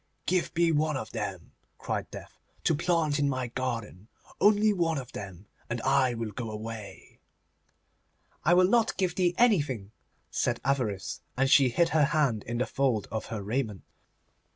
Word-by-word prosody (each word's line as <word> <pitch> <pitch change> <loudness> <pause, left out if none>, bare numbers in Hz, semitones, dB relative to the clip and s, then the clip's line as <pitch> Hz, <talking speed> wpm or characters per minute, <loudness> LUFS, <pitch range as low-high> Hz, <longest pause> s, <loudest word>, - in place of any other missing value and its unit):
'Give 180 -1 +1
me 170 0 +3
one 155 -1 +1
of 110 - -6
them,' 100 -6 -5 0.3
cried - - -3
Death, - - -11 0.2
'to - - +3
plant 160 -2 +1
in 145 -1 +2
my 130 -2 -2
garden; 115 -6 -4 0.3
only 210 +1 +5
one 165 -4 0
of 130 -3 -6
them, 95 -1 -8 0.2
and 120 0 -2
I 130 -1 +2
will 115 -2 -4
go 115 +2 -5
away.' 110 -1 -8 1.2
'I 170 - +4
will 180 0 +6
not 230 +2 +2
give 185 -3 +1
thee 180 -1 +1
anything,' 145 - +2 0.4
said - - 0
Avarice, 125 -8 -1 0.2
and 135 +1 +2
she 135 -3 +6
hid 170 +8 +2
her 155 -2 +4
hand 140 -7 +1
in 120 +1 -3
the 125 - +1
fold 125 -7 0
of 110 0 -3
her 110 -3 -5
raiment. 110 -2 -2
130 Hz, 165 wpm, -28 LUFS, 110-165 Hz, 1.2 s, will